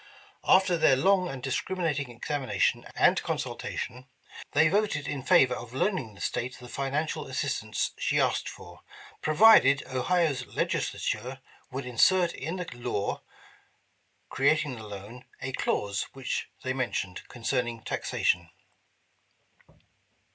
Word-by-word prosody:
After 185 Hz, -2 st, +4 dB
their 155 Hz, -4 st, +5 dB
long 185 Hz, +5 st, +3 dB
and 130 Hz, -2 st, -7 dB
discriminating 150 Hz, 0 st, -1 dB
examination 130 Hz, +3 st, -1 dB
and -, -, +4 dB
consultation, 125 Hz, +2 st, -4 dB, 0.5 s
they 160 Hz, -, +5 dB
voted 195 Hz, -5 st, 0 dB
in 140 Hz, -2 st, -3 dB
favor 130 Hz, 0 st, +5 dB
of 120 Hz, 0 st, -7 dB
loaning 130 Hz, -, -1 dB
the -, -, -13 dB
State 125 Hz, +2 st, -2 dB
the 125 Hz, -, -11 dB
financial 140 Hz, +5 st, -2 dB
assistance -, -, -2 dB
she -, -, +1 dB
asked -, -, +1 dB
for, -, -, -12 dB, 0.4 s
provided 155 Hz, -5 st, +6 dB
Ohio's 135 Hz, -1 st, 0 dB
Legislature 130 Hz, +2 st, -2 dB, 0.3 s
would 135 Hz, 0 st, -5 dB
insert 170 Hz, +9 st, +3 dB
in 160 Hz, +6 st, -4 dB
the 180 Hz, -1 st, -4 dB
law 120 Hz, -4 st, -3 dB, 1.1 s
creating 145 Hz, 0 st, +2 dB
the 110 Hz, -2 st, -9 dB
loan, 105 Hz, +5 st, -9 dB
a 135 Hz, -, -4 dB
clause 100 Hz, -5 st, -1 dB
which 135 Hz, -2 st, -3 dB
they 130 Hz, -, -1 dB
mentioned, 120 Hz, -8 st, -2 dB
concerning 120 Hz, -1 st, -2 dB
taxa -, -, -3 dB
tion. 85 Hz, -1 st, +2 dB
135 Hz, 120 wpm, -28 LUFS, 125-160 Hz, 1.1 s, provided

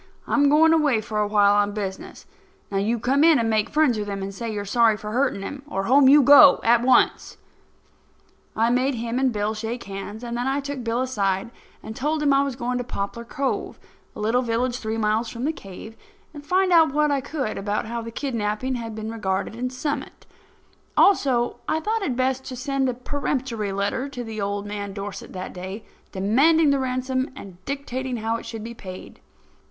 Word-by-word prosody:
I'm 285 Hz, -1 st, +3 dB
going 320 Hz, +2 st, +5 dB
away 295 Hz, -8 st, +3 dB
for 215 Hz, 0 st, -3 dB
a 210 Hz, -, +1 dB
while, 205 Hz, -1 st, +4 dB
on 205 Hz, 0 st, +2 dB
business. 195 Hz, -2 st, -6 dB, 0.5 s
Now, 195 Hz, -, 0 dB
you 220 Hz, +4 st, 0 dB
come 265 Hz, +6 st, +2 dB
in 325 Hz, -2 st, +6 dB
and 225 Hz, -1 st, 0 dB
make 215 Hz, -1 st, +1 dB
friends 295 Hz, -7 st, +2 dB
with 205 Hz, -, -4 dB
him 200 Hz, -1 st, -4 dB
and 195 Hz, 0 st, -5 dB
say 230 Hz, +3 st, -5 dB
you 210 Hz, -1 st, -3 dB
are -, -, -7 dB
sorry 225 Hz, +1 st, +3 dB
for 210 Hz, 0 st, -7 dB
hurting 250 Hz, -4 st, 0 dB
him, 275 Hz, +7 st, -6 dB
or 195 Hz, -9 st, -3 dB
home 265 Hz, +5 st, +5 dB
you 290 Hz, +1 st, +7 dB
go, 285 Hz, +2 st, +8 dB
at 235 Hz, +1 st, +4 dB
once." 255 Hz, +1 st, +2 dB, 1.2 s
I 230 Hz, +2 st, +2 dB
made 255 Hz, +2 st, +1 dB
him 235 Hz, +2 st, -2 dB
and 265 Hz, -1 st, +2 dB
Bill 210 Hz, 0 st, -1 dB
shake 225 Hz, +3 st, -5 dB
hands, 200 Hz, +3 st, -7 dB
and 235 Hz, 0 st, -4 dB
then 245 Hz, +2 st, -2 dB
I 270 Hz, +1 st, 0 dB
took 280 Hz, -2 st, -5 dB
Bill 230 Hz, +2 st, -1 dB
aside 200 Hz, -4 st, -1 dB, 0.3 s
and 220 Hz, -, -7 dB
told 300 Hz, +4 st, -1 dB
him 285 Hz, -1 st, +4 dB
I 275 Hz, -, +4 dB
was 280 Hz, -2 st, -2 dB
going 250 Hz, 0 st, -2 dB
to -, -, -2 dB
Poplar 235 Hz, -1 st, -5 dB
Cove, 270 Hz, +3 st, -3 dB, 0.4 s
a -, -, -9 dB
little 225 Hz, +4 st, +1 dB
village 245 Hz, +1 st, -1 dB
three 220 Hz, 0 st, -3 dB
miles 220 Hz, +1 st, 0 dB
from 240 Hz, +2 st, -5 dB
the 315 Hz, -, 0 dB
cave, 200 Hz, -1 st, -11 dB, 0.4 s
and 290 Hz, -2 st, -10 dB
find 370 Hz, +4 st, +1 dB
out 325 Hz, -4 st, +6 dB
what 300 Hz, 0 st, +3 dB
I 280 Hz, -1 st, +1 dB
could 270 Hz, -4 st, -3 dB
about 205 Hz, +2 st, -2 dB
how 235 Hz, +1 st, -4 dB
the 230 Hz, -, -7 dB
kidnapping 230 Hz, -1 st, -2 dB
had 230 Hz, -3 st, -5 dB
been 220 Hz, 0 st, -5 dB
regarded 200 Hz, -2 st, -2 dB
in 250 Hz, +2 st, -3 dB
Summit. 275 Hz, +2 st, -5 dB, 0.7 s
Also, 260 Hz, -11 st, +3 dB
I 315 Hz, -, +1 dB
thought 435 Hz, +7 st, -1 dB
it 270 Hz, -11 st, -1 dB
best 260 Hz, +1 st, 0 dB
to 255 Hz, -, -6 dB
send 270 Hz, 0 st, -1 dB
a 250 Hz, -, -3 dB
peremptory 250 Hz, -5 st, -3 dB
letter 200 Hz, +8 st, -2 dB
to 240 Hz, -5 st, -6 dB
old 200 Hz, 0 st, -2 dB
man 205 Hz, -1 st, -5 dB
Dorset 200 Hz, 0 st, -7 dB
that 185 Hz, 0 st, -6 dB
day, 190 Hz, +4 st, -7 dB, 0.3 s
demanding 280 Hz, +11 st, +3 dB
the 280 Hz, -, +2 dB
ransom 260 Hz, 0 st, -1 dB
and 185 Hz, -7 st, -12 dB
dictating 260 Hz, -2 st, -4 dB
how 225 Hz, +1 st, -1 dB
it -, -, -10 dB
should 225 Hz, -2 st, -6 dB
be 235 Hz, +1 st, -7 dB
paid. 185 Hz, -5 st, -10 dB
235 Hz, 205 wpm, -23 LUFS, 210-270 Hz, 1.2 s, go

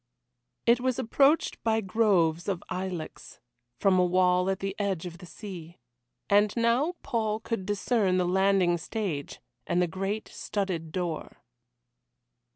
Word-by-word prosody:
It 235 Hz, +1 st, +5 dB
was 255 Hz, -1 st, 0 dB
approached 275 Hz, +7 st, +2 dB
by 225 Hz, -1 st, +2 dB
groves 185 Hz, -6 st, +2 dB
of 190 Hz, -4 st, -2 dB
ilex, 185 Hz, -3 st, -5 dB, 0.4 s
from 190 Hz, -2 st, +4 dB
a -, -, +5 dB
wall 180 Hz, +1 st, +3 dB
at 190 Hz, -, 0 dB
the 195 Hz, 0 st, -4 dB
edge 195 Hz, -4 st, -1 dB
of 170 Hz, -1 st, -8 dB
the 180 Hz, -, -11 dB
sea. 175 Hz, -5 st, -9 dB, 0.5 s
And 205 Hz, +1 st, +4 dB
now 240 Hz, +9 st, +2 dB
Paul 220 Hz, -5 st, -1 dB
could 220 Hz, -4 st, -4 dB
discern 205 Hz, -2 st, +1 dB
the 180 Hz, -, +2 dB
landing 185 Hz, -1 st, +3 dB
stage, 175 Hz, -7 st, -4 dB, 0.3 s
and 175 Hz, -, +1 dB
the 180 Hz, -, +4 dB
great 195 Hz, +5 st, -3 dB
studded 180 Hz, -6 st, -3 dB
door. 175 Hz, -2 st, -4 dB
195 Hz, 140 wpm, -28 LUFS, 180-220 Hz, 0.5 s, It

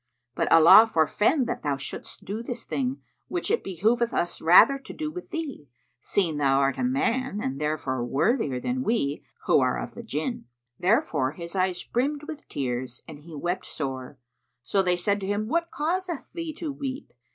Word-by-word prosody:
But -, -, -1 dB
Allah 165 Hz, +7 st, +9 dB
forfend 210 Hz, -, +2 dB
that 240 Hz, -, -3 dB
thou 145 Hz, -2 st, -1 dB
shouldst 135 Hz, -, -7 dB
do 210 Hz, +4 st, -4 dB
this 235 Hz, 0 st, -6 dB
thing, 265 Hz, 0 st, -2 dB, 0.3 s
which 355 Hz, +3 st, -2 dB
it 460 Hz, -, +1 dB
behoveth 225 Hz, +6 st, +1 dB
us 175 Hz, -, -1 dB
rather 180 Hz, +12 st, +7 dB
to 270 Hz, -, -10 dB
do 305 Hz, -1 st, -4 dB
with 360 Hz, +2 st, -8 dB
thee, 290 Hz, -, -5 dB, 0.3 s
seeing 170 Hz, -7 st, 0 dB
thou 135 Hz, -2 st, +3 dB
art 135 Hz, -1 st, +1 dB
a -, -, 0 dB
man 255 Hz, -2 st, 0 dB
and 135 Hz, -7 st, -3 dB
therefor 145 Hz, -5 st, -1 dB
worthier 140 Hz, -, +1 dB
than 250 Hz, -, -2 dB
we, 215 Hz, -, 0 dB, 0.2 s
who -, -, +5 dB
are -, -, +1 dB
of -, -, -5 dB
the -, -, -8 dB
Jinn."[FN#73] 160 Hz, -, -3 dB, 0.4 s
Thereupon 170 Hz, -, +1 dB
his 170 Hz, +2 st, -6 dB
eyes 185 Hz, -1 st, 0 dB
brimmed 285 Hz, +5 st, -1 dB
with 310 Hz, -1 st, -8 dB
tears 125 Hz, -2 st, -3 dB
and 155 Hz, -3 st, -10 dB
he 160 Hz, +1 st, -11 dB
wept 175 Hz, +5 st, -3 dB
sore; 135 Hz, -2 st, -5 dB, 0.5 s
so 195 Hz, +11 st, +2 dB
they 180 Hz, -1 st, +1 dB
said 200 Hz, +3 st, +1 dB
to 190 Hz, -, -4 dB
him, 205 Hz, +1 st, -1 dB
"What 335 Hz, +6 st, 0 dB
causeth 340 Hz, +3 st, -3 dB
thee 335 Hz, -2 st, -4 dB
to 315 Hz, -1 st, -4 dB
weep? 275 Hz, 0 st, -6 dB
205 Hz, 185 wpm, -26 LUFS, -, 0.5 s, Allah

